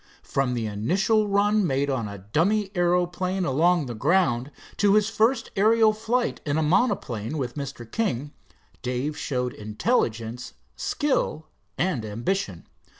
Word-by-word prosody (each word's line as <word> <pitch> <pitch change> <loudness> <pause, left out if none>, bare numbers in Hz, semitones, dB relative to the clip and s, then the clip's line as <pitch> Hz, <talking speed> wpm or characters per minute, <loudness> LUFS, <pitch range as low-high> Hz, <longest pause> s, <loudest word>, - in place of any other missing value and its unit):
From 135 -2 0
the 115 -2 -2
initial 190 - +1
run 205 0 +2
made 140 0 0
on 115 -5 -1
a 100 0 -7
dummy 185 - 0
aeroplane 180 +1 +1
along 165 +4 +3
the 120 - -5
ground, 140 - +1 0.3
to 205 -1 +4
his 210 0 +3
first 230 +2 +1
aerial 220 +2 +4
flight 230 +3 -1
in 145 0 -1
a 160 - +2
monoplane 150 - 0
with 125 -4 -3
Mr. 140 -4 -6
King, 145 - -2 0.5
Dave 125 +4 -2
showed 125 -4 -2
intelligence, 115 - -1 0.2
skill 160 - -1 0.3
and 165 -10 0
ambition. 110 - -3
155 Hz, 135 wpm, -25 LUFS, 125-200 Hz, 0.5 s, to